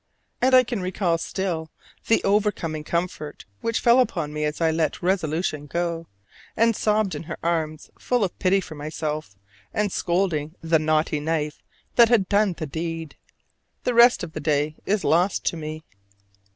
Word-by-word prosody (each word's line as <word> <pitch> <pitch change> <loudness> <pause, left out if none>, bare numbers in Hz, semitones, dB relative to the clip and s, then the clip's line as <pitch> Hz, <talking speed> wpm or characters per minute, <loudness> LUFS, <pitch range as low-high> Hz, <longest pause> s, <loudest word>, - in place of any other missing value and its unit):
And 260 +1 +5
I 255 - +8
can 235 -4 -3
recall 180 -2 0
still 170 -3 -3 0.4
the 225 - +3
overcoming 195 -7 0
comfort 170 -2 -3
which 230 0 -1
fell 240 +1 +5
upon 170 -11 0
me 150 0 -1
as 150 0 -3
I 165 -1 +3
let 160 -1 -1
resolution 160 -4 0
go, 170 +1 -2 0.5
and 230 0 +4
sobbed 210 -2 +1
in 150 - -4
her 160 - -4
arms 160 -2 -2
full 245 -3 +1
of 190 - -3
pity 195 +1 +3
for 170 - -9
myself 150 -4 -4 0.4
and 210 -1 0
scolding 170 -4 0
the 165 -1 +2
"naughty 155 0 +1
knife" 150 0 -2 0.4
that 235 -2 +7
had 220 -6 +3
done 205 -2 +3
the 160 - -3
deed. 165 0 -5 0.7
The 250 - 0
rest 240 +1 +6
of 160 - -6
that 155 - -4
day 150 0 0
is 205 +1 +1
lost 175 +5 +2
to - - +1
me. 155 0 -6
170 Hz, 165 wpm, -24 LUFS, 155-200 Hz, 0.7 s, I